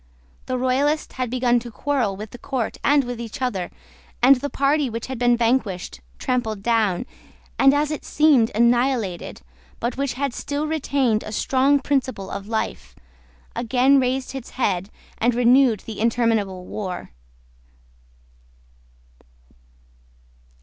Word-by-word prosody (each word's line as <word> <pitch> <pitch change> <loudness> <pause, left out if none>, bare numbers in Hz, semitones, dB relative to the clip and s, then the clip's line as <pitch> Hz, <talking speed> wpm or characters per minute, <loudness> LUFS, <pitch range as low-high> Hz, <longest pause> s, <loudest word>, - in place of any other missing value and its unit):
The 255 - -1
Royalists 275 +5 0
had 255 -2 -3
begun 245 -1 +2
to 240 +1 -9
quarrel 240 -4 -1
with 215 +1 -8
the 245 - -10
court 260 -5 -3
and 285 0 +4
with 245 -1 -5
each 230 -2 -7
other; 205 -9 -2 0.5
and 265 +3 +7
the 285 +3 -4
party 280 0 +1
which 230 0 -5
had 260 -2 -6
been 240 -1 +3
vanquished, 225 - -1 0.2
trampled 220 -5 -2
down, 225 -3 +1 0.5
and, 270 - +7
as 290 +1 +1
it 305 - -4
seemed, 285 -7 +4
annihilated, 235 -5 +1 0.4
but 240 +2 -2
which 275 -1 -1
had 275 0 -2
still 290 +4 -3
retained 275 -7 0
a 215 - -7
strong 270 +5 +2
principle 260 -8 -2
of 200 0 -6
life, 65 - -3 0.6
again 255 +4 +3
raised 260 +1 -1
its 265 -3 -7
head, 195 -6 0 0.3
and 240 +1 +2
renewed 245 -2 +4
the 220 -2 -8
interminable 220 -5 0
war. 185 - -5
245 Hz, 135 wpm, -22 LUFS, 220-270 Hz, 0.6 s, and